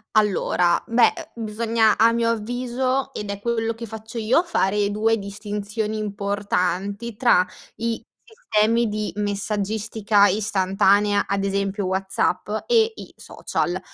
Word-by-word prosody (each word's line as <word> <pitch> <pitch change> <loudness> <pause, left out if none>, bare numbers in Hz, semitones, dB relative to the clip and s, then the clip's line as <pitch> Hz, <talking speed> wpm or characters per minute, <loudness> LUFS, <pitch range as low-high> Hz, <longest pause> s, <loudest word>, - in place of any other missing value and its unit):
Allora, 190 -4 +2
beh, 230 +1 +4 0.2
uhm, 230 -1 -6
bisogna 220 0 +2
a 230 +1 +5
mio 230 0 +1
avviso, 250 +4 -1
ed 205 -1 -5
è 200 0 -5
quello 230 0 -1
che 230 +1 -7
faccio 220 +2 -8
io, 230 +9 +3
fare 205 - 0
2 220 +2 +2
distinzioni 210 +2 -4
importanti 200 +1 -2
tra 200 -6 +4 0.3
i 230 0 -2 0.2
sistemi 235 - +1
di 210 0 -3
messaggistica 205 +1 +1
istantanea 200 0 +2
ad 195 0 -1
esempio 200 0 -1
WhatsApp 190 0 -1 0.2
e 455 -1 +3
i - - -10
social. - - -3
210 Hz, 125 wpm, -23 LUFS, 200-230 Hz, 0.3 s, a